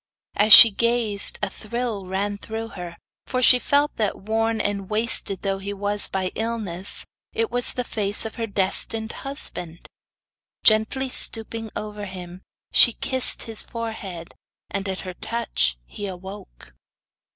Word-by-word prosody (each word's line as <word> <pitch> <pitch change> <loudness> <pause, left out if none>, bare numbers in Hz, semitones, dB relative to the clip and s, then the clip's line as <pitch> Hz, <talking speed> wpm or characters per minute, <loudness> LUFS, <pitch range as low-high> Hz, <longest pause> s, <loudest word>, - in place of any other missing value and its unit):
As 210 +1 +1
she 225 +1 +12
gazed 230 -1 +1
a - - -1
thrill 220 -3 -6
ran 200 +2 -4
through 225 +1 -7
her, 175 -4 -10 0.3
for 255 - -3
she 250 0 +5
felt 285 +3 0
that, 210 -3 -2
worn 225 +2 -2
and 200 -2 -3
wasted 215 -3 -3
though 195 -1 -2
he 200 +1 -6
was 205 +1 -1
by 190 -1 -3
illness, 215 -5 -1 0.3
it 450 -1 -3
was 245 0 +3
the 250 - -4
face 205 -2 +3
of 220 - -6
her 230 -1 -5
destined 215 +3 0
husband. 180 - -6 0.8
Gently 220 +5 +2
stooping 225 -2 +2
over 210 -1 -7
him 180 -1 -10 0.3
she 240 - +7
kissed 260 +2 +2
his 225 -2 -3
forehead, 210 -7 -7 0.4
and 195 0 -4
at 190 - -5
her 185 -1 -8
touch 215 - -2
he 205 - -7
awoke. 190 - -11
210 Hz, 145 wpm, -22 LUFS, 195-230 Hz, 0.8 s, she